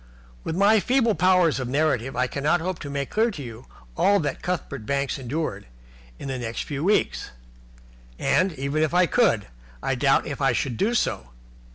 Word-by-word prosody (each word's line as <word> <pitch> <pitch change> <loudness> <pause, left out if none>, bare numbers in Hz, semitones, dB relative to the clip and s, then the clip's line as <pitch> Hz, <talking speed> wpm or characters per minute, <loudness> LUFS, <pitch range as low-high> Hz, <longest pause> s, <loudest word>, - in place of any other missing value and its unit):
With 160 - -3
my 205 +4 +5
feeble 240 0 +2
powers 180 -3 +3
of 130 - -3
narrative, 135 -2 0
I 125 +1 +2
cannot 145 +6 0
hope 180 +1 -3
to 145 - -7
make 140 -1 -3
clear 225 +2 +2
to 155 -10 -7
you 115 0 -10 0.3
all 200 - +3
that 150 - -3
Cuthbert 145 -8 -3
Banks 140 0 -1
endured 140 - -4 0.5
in - - -7
the 130 -1 -3
next 115 -1 -4
few 145 0 -4
weeks. 205 +4 +1 0.9
And, 185 +7 +2
even 140 +2 -2
if 155 +2 +1
I 180 0 +5
could, 180 - +2 0.4
I - - 0
doubt - - +2
if - - -5
I - - +3
should 125 -4 -1
do 230 - +1
so. - - -1
150 Hz, 185 wpm, -24 LUFS, 135-185 Hz, 0.9 s, my